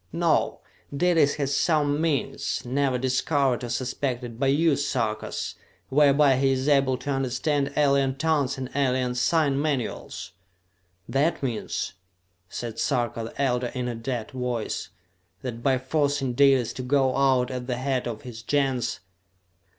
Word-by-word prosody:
No, 170 -1 +1 0.4
Dalis 165 -4 +3
has 140 -1 -1
some 150 -3 +2
means, 160 -4 -1
never 130 +1 +1
discovered 130 0 +1
or 120 - -4
suspected 125 -1 -3
by 135 - +2
you 150 +2 +3
Sarkas, 115 -7 -2 0.4
whereby 140 -1 +5
he 135 0 +3
is 130 +1 -2
able 135 -3 +3
to 145 - -4
understand 140 +2 0
alien 140 -2 +3
tongues 145 -3 0
and 130 -1 -5
alien 130 -2 +1
sign 140 +2 +2
manuals!" 120 - -3 0.8
"That 145 +3 0
means," 120 -5 -3 0.6
said 115 -2 -5
Sarka 120 -4 0
the 115 - -10
Elder 125 -3 +1
in 125 -1 -2
a 120 - -2
dead 120 +1 -4
voice, 125 -4 -3 0.5
"that 120 -3 -5
by 130 +1 +2
forcing 140 0 0
Dalis 135 -2 +4
to - - -5
go 130 0 +2
out 130 -2 +2
at 125 -1 -5
the 125 -2 -1
head 130 -1 -1
of 115 -3 -5
his 120 -3 -8
Gens...." 135 0 0
135 Hz, 145 wpm, -25 LUFS, 125-140 Hz, 0.8 s, whereby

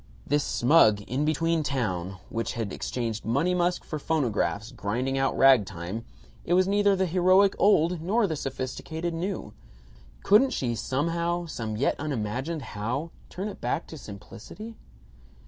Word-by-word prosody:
This 145 +1 +1
smug 120 -6 +4
in 130 +8 -2
between 165 +1 +1
town, 95 - -2
which 115 0 -3
had 110 -5 -3
exchanged 115 -3 -3
"Money 165 +11 +1
Musk" 175 0 +1
for 155 - -5
phonographs 110 - -1
grinding 125 +6 -2
out 135 0 0
ragtime, 110 -5 +3 0.4
it 175 - +1
was 185 0 +4
neither 205 0 +3
the 190 0 +1
heroic 185 +3 +4
old 175 -4 +3
nor 210 +7 +2
the 165 -5 -1
sophisticated 155 +5 -4
new. 170 - -4 0.7
Couldn't 255 +6 +5
she 120 -3 -1
somehow, 170 +9 -1
some 110 -9 -4
yet 135 - 0
unimagined 135 +2 -3
how, 120 +10 -3 0.2
turn 190 +4 -4
it 205 - -8
back 165 - -1
to - - -8
simplicity? 115 - -10
145 Hz, 145 wpm, -27 LUFS, 115-175 Hz, 0.7 s, Couldn't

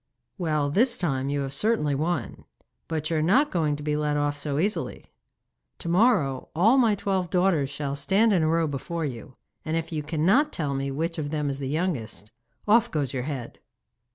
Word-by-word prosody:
'Well, 155 -4 0
this 235 - +3
time 135 -6 -1
you 145 0 -1
have 135 0 -4
certainly 150 -3 +1
won; 150 - -2 0.4
but 155 -1 -3
you 160 - +1
are - - +1
not 210 - +3
going 155 -4 +1
to 145 - -8
be 150 0 0
let 150 -1 0
off 145 0 0
so 145 -1 -3
easily. 200 +7 -2 0.7
To 170 - -5
morrow 170 - +2
all 220 +11 +5
my 225 -4 +4
twelve 190 -3 -1
daughters 175 -6 +2
shall 140 -1 -3
stand 195 +10 +3
in 180 - +3
a 155 - +2
row 165 +1 +2
before 155 +3 -3
you, 130 -1 -7 0.3
and 160 +1 -1
if 165 0 -4
you 155 -2 -2
cannot 180 - +2
tell 145 -4 -2
me 135 0 -2
which 165 +5 -2
of 145 -2 -3
them 150 -2 -1
is 135 - -5
the 135 -1 -3
youngest, 140 - -3 0.4
off 230 +2 +5
goes 145 -4 -2
your 130 - -1
head. 130 -5 -6
155 Hz, 200 wpm, -26 LUFS, 140-180 Hz, 0.7 s, all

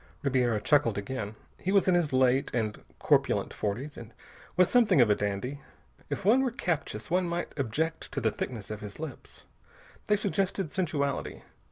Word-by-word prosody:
Ribiera 125 -5 +2
chuckled 135 -2 +3
again. 105 0 -4 0.2
He 190 - -1
was 200 -1 +4
in 185 - +5
his 175 -4 +2
late 130 +1 +3
and 110 -3 -1 0.2
corpulent - - +2
forties 120 +9 -3
and 115 0 -10 0.4
was 180 -1 +6
something 240 - +4
of 115 -4 +6
a - - +5
dandy. 105 +8 -3 0.5
If - - -4
one 235 +6 +6
were 265 - +1
captious, 165 - -3
one 180 0 +2
might 170 +1 -3
object 155 +5 -2
to - - -1
the 115 -4 +1
thickness 110 -3 -5
of 105 -1 -5
his 105 +3 -8
lips. 155 -5 -8 0.6
They 210 - +4
suggested 195 -4 -1
sensuality. 150 -6 -2
140 Hz, 170 wpm, -29 LUFS, 110-175 Hz, 0.6 s, was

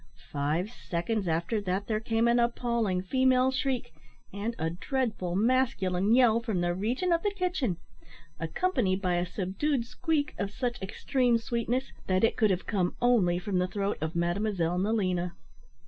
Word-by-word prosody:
Five 155 +8 -1
seconds 200 -1 -2
after 170 +7 0
that 190 +1 -2
there 215 0 -1
came 225 +1 +1
an 235 +1 +4
appalling 235 -5 0
female 260 +4 +3
shriek, 265 - -2 0.4
and 215 +4 -3
a 160 +1 -1
dreadful 205 - -2
masculine 205 -3 +2
yell, 240 -3 +5
from 220 -6 -2
the 175 0 +1
region 240 - -1
of 335 - +2
the 415 - +1
kitchen, 360 - -1 0.6
accompanied 190 - 0
by 180 -3 0
a 175 +1 0
subdued 225 - -1
squeak 305 +4 -1
of 200 - -1
such 240 +2 -3
extreme 240 +5 +1
sweetness, 235 +3 -2
that 185 +1 +2
it 225 - +3
could 215 - +3
have 185 -2 0
come 185 -5 0
only 220 -8 +3
from 180 +1 -1
the 180 - +1
throat 200 +1 -2
of 160 +2 -3
Mademoiselle 175 0 0
Nelina. 185 -4 0
210 Hz, 160 wpm, -29 LUFS, 180-245 Hz, 0.6 s, yell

